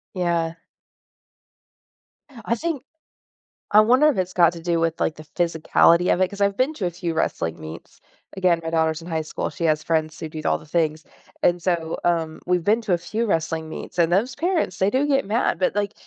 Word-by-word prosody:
Yeah. 170 -2 0 1.9
I - - +2
think 310 -1 -3 0.9
I 210 - +7
wonder 250 +8 +5
if 290 - -1
it's 185 -1 -1
got 170 -2 +5
to 170 - -9
do 170 0 0
with, 165 0 0
like, 155 - 0
the 155 - -11
physicality 170 +2 +3
of - - -1
it, 185 - +3
'cause 200 +2 -9
I've 200 0 +2
been 265 +5 +1
to 200 - -3
a - - -3
few 170 -1 -4
wrestling 85 - -1
meets. 80 +1 -10 0.3
Again, 180 -3 +2
my 165 - -4
daughter's 160 0 0
in 165 - -11
high 160 -2 -1
school, 155 - -4
she - - -7
has 155 -2 +2
friends 155 0 -1
who 160 - -4
do 155 0 -7
all - - +1
the - - -15
things. 155 -1 -1 0.4
And 175 0 +2
so, 165 -3 -1
um, 165 -2 0
we've 180 -1 0
been 220 +3 +3
to 210 -5 0
a - - +3
few 215 +7 -3
wrestling 165 -4 -1
meets, 160 - -8
and 170 -1 +3
those 230 +7 +1
parents, 335 - -1
they 190 - +2
do 265 +6 +1
get 275 -2 +2
mad, 215 -2 0
but, 185 - +1
like 205 0 -1
175 Hz, 215 wpm, -23 LUFS, 160-205 Hz, 1.9 s, I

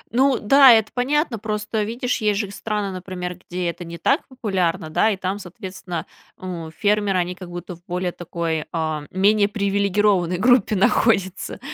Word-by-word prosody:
Ну 265 -1 +4
да, 270 +4 +7
это 220 -1 +2
понятно, 260 - 0
просто, 215 0 -2
видишь, 240 +3 -2
есть 210 -1 +1
же 200 -3 -3
страны, 210 -1 -3
например, 180 -1 -5
где 180 0 -2
это 175 +1 -10
не 170 0 -8
так 275 - +1
популярно, 185 - -2
да, 215 +7 +3
и 200 - -1
там, 190 +2 -3
соответственно, 185 -2 -7 0.3
у, 175 -3 -6
фермеры, 205 +3 +1
они 180 0 -1
как 180 -1 -10
будто 175 0 -7
в 170 - -23
более 180 0 -2
такой, 165 -2 -3
а, 155 -2 -2
менее 200 +2 +3
привилегированной 200 -3 +1
группе 230 0 +3
находятся, 195 -1 +1
195 Hz, 165 wpm, -22 LUFS, 180-215 Hz, 0.3 s, да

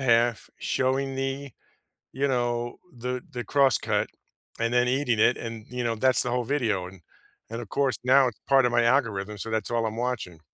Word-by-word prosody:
half, 120 -2 +2
showing 135 +1 0
the 135 0 -3 0.6
you 140 +2 0
know, 120 -2 -1 0.2
the 125 +1 -3
the 120 -1 -5
crosscut, 135 +2 +2 0.5
and 115 +1 0
then 125 0 +3
eating 125 -3 +1
it, 120 - +5
and, 115 -2 -7
you 125 -1 -3
know, 115 -1 0
that's 130 +3 +3
the 125 - -2
whole 125 0 0
video. 115 -8 0
And 95 -1 -13 0.5
and 115 +1 -5
of 110 - -10
course, 140 -2 +1
now, 130 +1 +5
it's 115 - -6
part 135 -2 +5
of 120 - +2
my 120 0 +3
algorithm, 110 -5 +1
so 115 - -5
that's 110 -2 -1
all 115 -1 +1
I'm 110 0 -3
watching. 115 -9 -3
120 Hz, 195 wpm, -26 LUFS, 115-130 Hz, 0.6 s, it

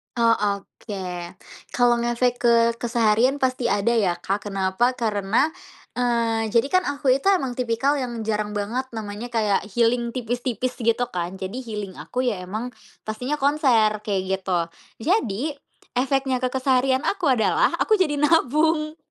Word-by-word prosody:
Oh, 230 -1 +4
oke. 195 -3 -4 0.4
Kalau 245 -1 +4
ngefek 240 +1 +1
ke 235 -1 +4 0.3
keseharian 235 +2 +2
pasti 255 -2 +1
ada 205 +1 +1
ya, 200 -7 +2
Kak, 195 +4 -3
kenapa? 195 +5 0
Karena, 220 +4 +1 0.5
eee, 230 -2 +1
jadi 235 +3 +3
kan 370 0 +3
aku 280 -2 +1
itu 275 - -4
emang 275 -11 +2
tipikal 250 +4 +1
yang 240 -3 -4
jarang 210 -1 -2
banget 220 +6 -2
namanya 215 +1 -5
kayak, 210 -3 +1
healing 235 +2 +1
tipis-tipis 245 +1 -3
gitu 230 +1 +1
kan, 175 +1 -3
jadi 190 +6 -4
healing 210 -6 -6
aku 250 +1 -3
ya 205 -6 -3
emang 215 +7 -4 0.3
pastinya 250 +7 -3
konser, 255 -7 +3
kayak 200 -3 0 0.2
gitu. 185 -2 0 0.4
Jadi, 275 - 0 0.5
efeknya 270 0 +1
ke 255 0 0
keseharian 260 0 +2
aku 370 -4 -1
adalah 260 - +3
aku 440 - +3
jadi 325 -7 +1
nabung. 310 +1 +2
235 Hz, 145 wpm, -23 LUFS, 210-260 Hz, 0.5 s, Oh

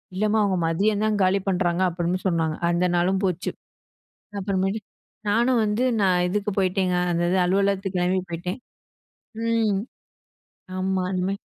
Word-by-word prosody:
"இல்லம்மா 215 +2 +2
அவங்க 195 -2 +1
மதியம் 205 +6 +1
தான் 215 -1 +1
காலி 190 +1 +2
பண்றாங்க" 180 -1 +1
அப்டின்னு 175 +1 -2
சொன்னாங்க. 165 -3 0
அந்த 175 +1 +2
நாளும் 190 +2 +1
போச்சு. 180 -2 -1 0.9
அப்புறமேட்டு 195 +2 -1 0.5
நானும் 240 +3 +3
வந்து 210 +3 0 0.2
நான் 180 -2 +3
இதுக்கு 205 +1 -1
போய்ட்டேங்க. 185 -1 +1 0.2
அந்த 170 - 0
இது 190 - +3
அலுவலகத்துக்கு 195 0 +1
கெளம்பி 185 +1 +1
போய்ட்டேன். 180 +7 -4 0.9
ம். 225 -3 +2 1.0
ஆமா 190 0 0
இனிமே 185 +2 -1
190 Hz, 130 wpm, -24 LUFS, 180-205 Hz, 1.0 s, நானும்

